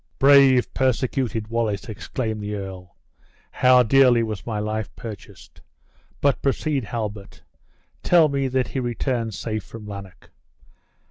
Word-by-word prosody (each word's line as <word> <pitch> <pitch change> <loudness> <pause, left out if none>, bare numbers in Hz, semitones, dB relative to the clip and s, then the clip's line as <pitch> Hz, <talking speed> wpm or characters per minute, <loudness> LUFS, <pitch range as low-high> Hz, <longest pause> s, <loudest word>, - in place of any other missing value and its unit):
"Brave, 135 -2 +5
persecuted 125 -3 -1
Wallace!" 115 -3 -2
exclaimed 110 0 -4
the 105 0 -4
earl; 95 -3 -8 0.6
"how 125 -1 +5
dearly 125 0 +4
was 110 -5 -5
my 110 -2 -2
life 110 +1 -3
purchased! 110 -4 -11 0.6
But 140 -1 +2
proceed, 140 -1 -1
Halbert; 105 -3 -6 0.6
tell 170 -3 +5
me 140 -2 -1
that 130 0 -1
he 135 - -3
returned 120 -2 -2
safe 110 -3 -4
from 115 +1 -11
Lanark." 100 -3 -10
115 Hz, 125 wpm, -23 LUFS, 105-130 Hz, 0.6 s, Brave